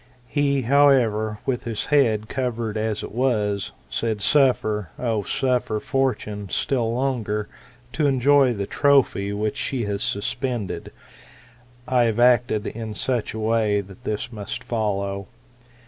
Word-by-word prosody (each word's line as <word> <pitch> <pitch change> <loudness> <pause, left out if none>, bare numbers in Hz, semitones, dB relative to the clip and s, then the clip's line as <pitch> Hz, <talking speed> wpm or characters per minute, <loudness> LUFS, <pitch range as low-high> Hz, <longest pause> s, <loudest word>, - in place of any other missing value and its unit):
He, 140 0 +1
however, 120 -5 +3
with 125 -2 -2
his 115 -3 -2
head 110 -7 +3
covered 120 -4 -2
as 110 -1 -1
it - - -6
was, 105 -5 0 0.2
said. 110 -2 -2
Suffer, 110 - +2
O 115 -4 0
suffer 125 0 0
Fortune 105 -7 -2
still 120 +2 0
longer 115 -5 -1 0.5
to 150 -2 +1
enjoy 135 -1 +4
the 100 -1 -2
trophy 135 -7 +2
which 105 +5 -2
she 130 -2 -2
has 100 -1 -2
suspended. 105 -3 -2 1.0
I 125 -2 +3
have 115 0 0
acted 120 -3 +3
in 110 -1 -5
such 120 -2 -1
a - - -4
way 110 -2 +2
that 100 +5 -14
this 115 +1 -3
must 105 -3 -6
follow. 100 -4 -2
115 Hz, 130 wpm, -23 LUFS, 105-130 Hz, 1.0 s, enjoy